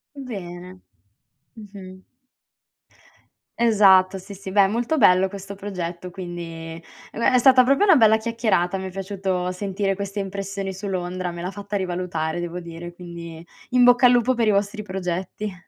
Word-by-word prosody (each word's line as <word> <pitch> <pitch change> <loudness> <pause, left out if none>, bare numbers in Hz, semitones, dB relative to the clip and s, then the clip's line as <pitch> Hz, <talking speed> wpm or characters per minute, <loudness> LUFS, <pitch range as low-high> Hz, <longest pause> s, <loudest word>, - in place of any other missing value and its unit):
Bene. 185 -8 -8 0.7
Mh-mh. 195 -3 -12 1.6
Esatto, 195 -5 +5
sì, 195 +2 -10
sì. 195 -1 -8
Beh, 200 0 +5
è 195 - +3
molto 240 +8 -1
bello 190 -6 +5
questo 200 0 -8
progetto, 180 -3 -6
quindi 175 -1 -7
e 165 0 -8 0.3
beh, 235 +3 +1
è 255 - +6
stata 255 0 +6
proprio 275 +9 +3
una 385 -5 +6
bella 220 -3 +5
chiacchierata. 220 -5 0
Mi 190 - -5
è - - -6
piaciuto 190 -1 -3
sentire 195 +1 -2
queste 200 +1 -5
impressioni 195 0 -4
su 200 +2 -7
Londra, 185 -1 -3
me 170 0 -7
l'ha 185 - -3
fatta 205 +1 -7
rivalutare 175 -3 -2
devo 175 +1 -4
dire, 170 0 -9
quindi 170 -2 -9 0.2
in 250 0 +4
bocca 245 +1 +6
al - - +5
lupo 245 +1 +3
per 235 -3 0
i 215 - +5
vostri 205 +2 -1
progetti. 190 +1 -4
195 Hz, 165 wpm, -23 LUFS, 180-210 Hz, 1.6 s, è